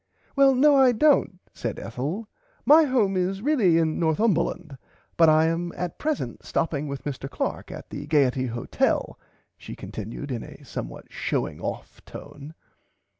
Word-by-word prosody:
Well 275 -1 +5
no 285 +2 +5
I 260 -2 +6
dont 275 -6 +3 0.2
said 115 -3 -4
Ethel 145 - -4 0.4
my 310 +2 +7
home 230 -8 +1
is 190 +2 -1
really 235 - +3
in 160 -1 +1
Northumberland 165 - 0 0.4
but 165 -1 +6
I 155 +1 +5
am 170 +1 -1
at 180 -2 -5
present 295 - -3
stopping 150 -2 -1
with 140 -1 -6
Mr 135 -1 -5
Clark 125 - -4
at - - -10
the - - -6
Gaierty 135 -4 +2
Hotel 120 0 -1 0.4
she - - -9
continud 115 +7 -7
in 120 -3 -3
a - - -12
somewhat - - -7
showing - - -2
off - - -6
tone. 145 +2 -11
165 Hz, 150 wpm, -25 LUFS, 140-230 Hz, 0.4 s, my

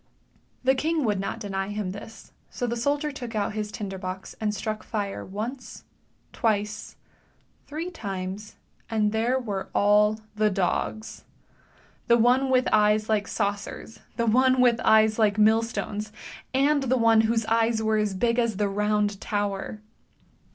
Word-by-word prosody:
The 260 +1 +4
king 310 +2 0
would 205 -3 +1
not 195 - -3
deny 195 -3 -3
him 205 -2 -3
this, 205 +3 -11 0.2
so 245 - -3
the 235 0 -2
soldier 285 +5 0
took 245 -4 -7
out 210 0 -1
his 210 -1 -3
tinder 195 -3 -5
box 185 0 -6
and 215 -1 +1
struck 215 +1 -4
fire, 205 -3 -4
once, 225 +7 -6 0.5
twice, 215 -1 -1 0.7
three 325 +5 -5
times, 195 - -6 0.3
and 215 -2 +1
there 230 +4 +1
were 205 -7 -4
all 210 +1 +4 0.2
the 215 0 +3
dogs. 200 +3 -2 0.8
The 235 -1 +5
one 250 +3 +3
with 255 -1 +3
eyes 210 0 +3
like 210 -2 +1
saucers, 200 +2 -3 0.2
the 235 - +1
one 255 +3 +4
with 240 -2 +4
eyes 220 0 +4
like 210 -2 +3
millstones, 215 -1 +1 0.4
and 280 +2 +3
the 260 -1 +1
one 225 -2 +5
whose 225 0 +1
eyes 225 0 +2
were 220 0 +2
as 210 -2 0
big 230 +5 +1
as 230 -4 0
the 205 0 +1
Round 210 0 0
Tower. 205 0 -3
215 Hz, 150 wpm, -26 LUFS, 205-235 Hz, 0.8 s, The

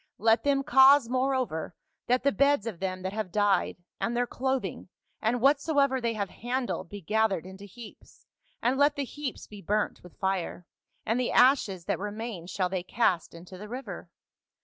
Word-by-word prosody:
Let 225 +1 +3
them 275 -1 +2
cause 275 -2 +6
moreover 255 -10 -1 0.3
that 250 +1 +2
the 280 - +3
beds 280 -5 +2
of 225 -6 -4
2:W - - -28
FA - - 0
UL. - - +1
them 185 - -13
that 190 +1 -3
have 215 -4 -3
died, 205 0 +1 0.2
and 240 +1 -1
their 245 - +2
clothing 255 -8 -3 0.3
and 230 +2 0
whatsoever 280 -1 +3
they 235 -1 0
have 200 -2 -3
handled 240 -8 -3
be 205 +1 -8
gathered 210 -1 +1
into 190 +2 -10
heaps, 220 +2 -14 0.4
and 255 +3 +1
let 290 +1 +4
the 285 - -2
heaps 285 0 -6
be 205 -1 -12
burnt 210 +2 -1
with 180 - -16
fire, 190 -2 -2 0.4
and 225 +3 +1
the 250 - 0
ashes 230 -9 +3
that - - -1
remain 210 -3 -5
shall 185 0 -1
they 185 0 -2
cast 180 -3 0
into 180 +2 -11
the 210 +1 -9
river. 230 -8 -7
225 Hz, 190 wpm, -28 LUFS, 190-260 Hz, 0.4 s, cause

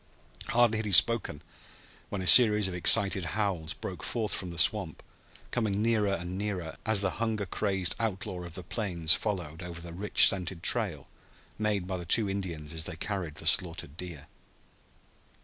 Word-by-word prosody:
Hardly 115 -2 +1
had 110 - -4
he - - -4
spoken 105 -6 +3 0.7
when 100 -2 -5
a - - -6
series 105 -1 +7
of 95 - -6
excited 95 +1 +5
howls 95 -7 -2
broke - - -8
forth 110 -4 -1
from 90 - -3
the 85 - -10
swamp, 90 -1 +3 0.5
coming 105 -5 -2
nearer 110 -2 0
and 90 +2 -7
nearer 95 -6 -5
as 110 -2 +3
the 95 -2 0
hunger 110 -3 -2
crazed 95 -1 -2
outlaw 95 -5 -4
of 85 -1 -9
the 95 - -6
plains 85 -5 0
followed 90 -6 -4
over 85 -1 -8
the 85 0 -9
rich 100 +4 +5
scented 90 -2 -3
trail 90 - 0 0.5
made 105 -4 -2
by 95 0 -5
the 90 - -9
two 105 +5 +2
Indians 85 -6 -6
as 80 -1 -5
they 90 - -6
carried 85 -3 -6
the - - -8
slaughtered 85 -5 +2
deer. 85 -5 -9
95 Hz, 170 wpm, -28 LUFS, 85-105 Hz, 0.7 s, series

